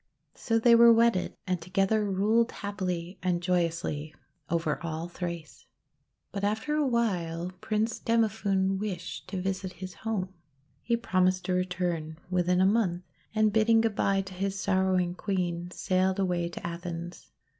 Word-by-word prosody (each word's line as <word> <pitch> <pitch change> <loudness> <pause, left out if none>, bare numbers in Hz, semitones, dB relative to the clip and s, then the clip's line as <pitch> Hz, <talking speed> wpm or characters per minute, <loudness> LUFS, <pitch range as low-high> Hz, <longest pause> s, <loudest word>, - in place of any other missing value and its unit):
So 225 -2 0
they 235 +1 +5
were 235 0 +8
wedded, 230 -4 +3
and 180 -2 -1
to 165 - -11
gether 200 +2 +2
ruled 215 +5 +2
happily 185 -3 -4
and 180 -2 +1
joyously 170 -4 -1 0.3
over 165 -2 0
all 165 0 -4
Thrace. 170 -3 -7 0.6
But 200 0 -4
after 220 +8 0
a 300 -2 +2
while 180 -8 0
Prince 220 +1 -1
Demophoon 200 -4 +1
wished 185 -4 -5
to 190 0 -4
visit 190 0 -3
his 185 -1 -8
home. 195 -4 -3 0.5
He 235 0 +1
promised 185 -5 +1
to 185 - 0
return 180 -3 -2
within 180 0 +2
a - - +5
month, 190 -4 +2 0.3
and, 215 -1 +3
bidding 225 +1 +4
good 225 -2 0
bye 195 0 +2
to 190 -1 -9
his 195 +1 -2
sorrowing 185 -2 +1
Queen, 175 -3 -2
sailed 185 +1 0
away 180 -3 0
to 175 - -8
Athens. 170 0 -6
185 Hz, 150 wpm, -28 LUFS, 175-210 Hz, 0.6 s, were